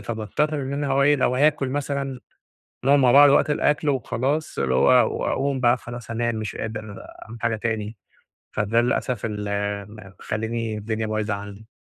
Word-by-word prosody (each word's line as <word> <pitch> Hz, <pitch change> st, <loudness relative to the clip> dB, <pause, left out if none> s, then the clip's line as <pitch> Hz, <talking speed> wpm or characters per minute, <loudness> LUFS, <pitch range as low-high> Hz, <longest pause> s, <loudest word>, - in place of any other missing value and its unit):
فباضطر 110 Hz, +8 st, -2 dB
إن 135 Hz, +1 st, -4 dB
أنا 145 Hz, 0 st, -2 dB
هو 135 Hz, 0 st, +2 dB
إيه 145 Hz, +1 st, +4 dB
لو 125 Hz, -1 st, +1 dB
هاكل 140 Hz, -1 st, +2 dB
مثلًا، 140 Hz, -1 st, -3 dB, 0.7 s
نقعد 140 Hz, +1 st, +5 dB
مع 125 Hz, -2 st, +5 dB
بعض 145 Hz, +1 st, +8 dB
وقت 140 Hz, -, +3 dB
الأكل 150 Hz, 0 st, +1 dB
وخلاص، 135 Hz, +3 st, -1 dB
اللي 65 Hz, -2 st, +1 dB
هو 125 Hz, -, +4 dB
وأقوم 135 Hz, 0 st, -1 dB
بقى 120 Hz, 0 st, +3 dB
خلاص 120 Hz, -2 st, -9 dB
هانام 115 Hz, 0 st, -1 dB
مش 110 Hz, -2 st, -4 dB
قادر 110 Hz, -2 st, -6 dB, 0.3 s
أعمل 115 Hz, +1 st, -11 dB
حاجة 115 Hz, -1 st, +1 dB
تاني، 110 Hz, -1 st, -3 dB, 0.5 s
فده 110 Hz, +3 st, +1 dB
للأسف 120 Hz, -2 st, -1 dB
ال 105 Hz, -2 st, -4 dB, 0.5 s
م -, -, -12 dB, 0.3 s
مخلّيني 115 Hz, 0 st, -3 dB
الدنيا 110 Hz, +1 st, -3 dB
بايظة 110 Hz, -1 st, -1 dB
عندي. 100 Hz, +2 st, -8 dB
120 Hz, 170 wpm, -23 LUFS, 110-140 Hz, 0.7 s, بعض